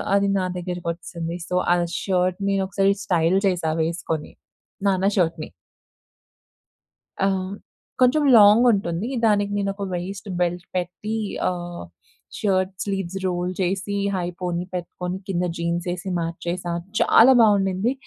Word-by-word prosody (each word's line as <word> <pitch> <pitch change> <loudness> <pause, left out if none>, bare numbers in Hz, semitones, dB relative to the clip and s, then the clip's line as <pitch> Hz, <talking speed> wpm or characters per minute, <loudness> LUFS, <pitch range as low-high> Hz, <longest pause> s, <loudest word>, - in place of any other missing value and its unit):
అది 200 0 +2
నా 185 - 0
దగ్గకొచ్చేసింది. 170 -1 -5
సో 180 - -1 0.2
ఆ - - +4 0.3
షర్ట్‌ 185 -1 0
నేనొకసారి 195 0 +2
స్టైల్ 175 +1 +2
చేశా 170 -4 -1
వేసుకొని, 160 -2 -3 0.5
నాన్న 190 -1 +2
షర్ట్‌ని. 165 -3 0 1.7
ఆహ్, 190 0 -1 0.5
కొంచెం 255 +4 +4
లాంగ్ 210 +3 +7
ఉంటుంది. 195 +1 -1 0.2
దానికి 205 -1 +2
నేనొక 200 0 -2
వైస్ట్ 190 +3 -5
బెల్ట్ 175 0 0
పెట్టి 185 +5 -3 0.3
ఆహ్, 175 -1 -5 0.6
షర్ట్ 190 -2 +1
స్లీవ్స్ 195 -2 -3
రోల్ 180 0 -1
చేసి 195 +2 -1 0.2
హైపోనీ 175 0 -3
పెట్టుకొని, 180 +1 -4
కింద 180 -2 0
జీన్స్ 170 +1 -2
వేసి 180 +2 -4
మ్యాచేశా, 170 +1 -3 0.3
చాలా 250 +4 +7
బాగుండింది. 200 +1 +2
185 Hz, 115 wpm, -23 LUFS, 175-195 Hz, 1.7 s, లాంగ్